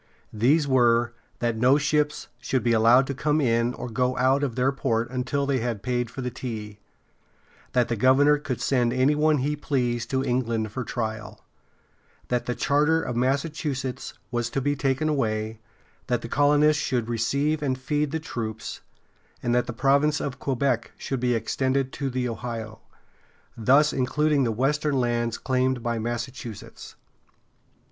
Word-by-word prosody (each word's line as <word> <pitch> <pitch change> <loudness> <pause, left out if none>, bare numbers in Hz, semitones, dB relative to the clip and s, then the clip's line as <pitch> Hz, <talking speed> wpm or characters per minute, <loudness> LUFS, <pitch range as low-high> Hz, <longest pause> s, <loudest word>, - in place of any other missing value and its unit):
These 140 +8 +3
were 120 -2 +3 0.2
that 120 -1 -1
no 125 +5 +4
ships 150 0 0
should 130 0 -1
be 120 - +2
allowed 115 +4 +5
to 140 - -3
come 150 +3 0
in 120 -2 +1
or - - -6
go 125 +2 -1
out 130 +3 +3
of 135 -5 -2
their 130 +1 +2
port 120 -3 -1
until 130 +2 -1
they 140 -2 +1
had 115 -4 -3
paid 120 0 -1
for 135 - -7
the 125 -1 -3
tea; 110 -4 -6 0.9
that 125 -2 +3
the 115 - -1
governor 140 +6 +4
could 135 -4 -4
send 120 -3 +1
any 130 +3 +3
one 150 +1 +3
he 145 +3 -1
pleased 120 -5 -1
to 130 0 0
England 115 -4 -1
for 130 +4 -4
trial; 110 -2 -5 0.8
that 125 -1 -1
the 125 - -1
charter 150 +3 +2
of 125 -7 -4
Massachusetts 135 0 -2 0.2
was 120 -1 -1
to 135 - -1
be 145 +2 0
taken 135 +2 0
away; 110 -6 -1 0.5
that 120 -1 0
the - - -4
colonists 145 +3 +3
should 120 -4 -1
receive 140 +7 0
and 130 -3 -1
feed 145 +3 -1
the 160 +3 -2
troops; 110 -7 -5 0.6
and 120 - +1
that 125 0 +1
the - - -3
province 140 +4 +2
of 135 -1 -4
Quebec 130 -3 -1
should 135 - -3
be 125 -1 +1
extended 130 +3 -1
to 140 -2 -3
the 125 -1 -2
Ohio, 115 -2 -5 0.8
thus 140 +7 +4
including 140 +2 +1
the 115 - 0
western 145 +5 0
lands 120 -1 0
claimed 130 -1 0
by 120 -1 -1
Massachusetts. 120 -1 -6
130 Hz, 165 wpm, -25 LUFS, 120-140 Hz, 0.9 s, allowed